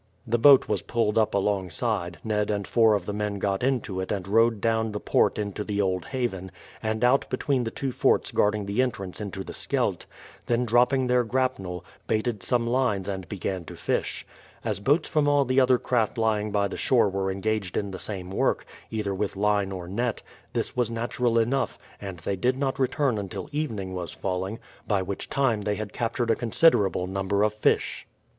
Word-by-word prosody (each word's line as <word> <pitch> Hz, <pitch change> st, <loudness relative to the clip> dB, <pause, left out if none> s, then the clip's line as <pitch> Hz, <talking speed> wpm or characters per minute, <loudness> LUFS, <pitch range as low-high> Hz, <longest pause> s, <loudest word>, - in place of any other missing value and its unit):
The 120 Hz, +1 st, +1 dB
boat 140 Hz, +2 st, +7 dB
was -, -, 0 dB
pulled 115 Hz, -3 st, 0 dB
up 110 Hz, -2 st, +2 dB
alongside, 95 Hz, -3 st, -1 dB
Ned 105 Hz, -2 st, 0 dB
and 100 Hz, -1 st, -1 dB
four 110 Hz, -2 st, +4 dB
of 100 Hz, -, -2 dB
the 105 Hz, -, -3 dB
men 105 Hz, -1 st, -2 dB
got 100 Hz, 0 st, -1 dB
into 120 Hz, -7 st, 0 dB
it 95 Hz, -, -3 dB
and 95 Hz, -3 st, -2 dB
rowed 115 Hz, +1 st, +3 dB
down 110 Hz, 0 st, 0 dB
the 105 Hz, -, -2 dB
port -, -, +2 dB
into 105 Hz, 0 st, -3 dB
the 105 Hz, -1 st, -3 dB
Old 95 Hz, -2 st, 0 dB
Haven, 120 Hz, -9 st, -3 dB, 0.3 s
and 110 Hz, +1 st, -1 dB
out 125 Hz, +3 st, +3 dB
between 130 Hz, -1 st, 0 dB
the -, -, -1 dB
two 135 Hz, +3 st, -3 dB
forts -, -, +2 dB
guarding 105 Hz, 0 st, +1 dB
the 100 Hz, +5 st, +1 dB
entrance 100 Hz, -7 st, -3 dB
into 95 Hz, -2 st, -5 dB
the -, -, -8 dB
Scheldt, -, -, -1 dB, 0.4 s
then 120 Hz, +1 st, +1 dB
dropping 125 Hz, +3 st, +3 dB
their 125 Hz, 0 st, +3 dB
grapnel, 115 Hz, -8 st, -2 dB, 0.2 s
baited 110 Hz, -1 st, 0 dB
some 120 Hz, -2 st, +1 dB
lines 120 Hz, -6 st, +1 dB
and 95 Hz, -2 st, -4 dB
began 95 Hz, -2 st, -3 dB
to -, -, -9 dB
fish. -, -, -2 dB, 0.4 s
As 105 Hz, -4 st, -1 dB
boats 145 Hz, -, +2 dB
from 150 Hz, -2 st, +1 dB
all 145 Hz, -1 st, +4 dB
the 130 Hz, +1 st, +3 dB
other 130 Hz, -1 st, +5 dB
craft 120 Hz, -3 st, 0 dB
lying 110 Hz, -2 st, +1 dB
by 100 Hz, -1 st, +2 dB
the -, -, -6 dB
shore 115 Hz, -5 st, +3 dB
were 95 Hz, 0 st, -1 dB
engaged 100 Hz, -1 st, -2 dB
in 100 Hz, -1 st, -2 dB
the 95 Hz, -, -6 dB
same 95 Hz, -3 st, -4 dB
work, -, -, 0 dB, 0.2 s
either 105 Hz, -3 st, -2 dB
with 100 Hz, +1 st, -2 dB
line 100 Hz, -1 st, +1 dB
or 90 Hz, -2 st, -6 dB
net, 115 Hz, +5 st, -2 dB, 0.3 s
this -, -, -2 dB
was 120 Hz, -3 st, +1 dB
natural 115 Hz, +1 st, 0 dB
enough, 120 Hz, +4 st, +1 dB, 0.2 s
and 95 Hz, -3 st, -6 dB
they 100 Hz, -, -1 dB
did 125 Hz, +7 st, +1 dB
not 135 Hz, -1 st, -1 dB
return 130 Hz, -3 st, +1 dB
until 95 Hz, -1 st, -5 dB
evening 110 Hz, -11 st, -3 dB
was 90 Hz, -3 st, -4 dB
falling, 95 Hz, +3 st, -3 dB, 0.3 s
by 100 Hz, -3 st, +1 dB
which 95 Hz, +1 st, -5 dB
time 120 Hz, -6 st, +1 dB
they 105 Hz, 0 st, -1 dB
had 105 Hz, 0 st, -6 dB
captured 115 Hz, 0 st, 0 dB
a -, -, +3 dB
considerable 110 Hz, -, +3 dB
number 95 Hz, +2 st, 0 dB
of 105 Hz, 0 st, +2 dB
fish. 105 Hz, -, 0 dB
105 Hz, 195 wpm, -26 LUFS, 100-120 Hz, 0.4 s, boat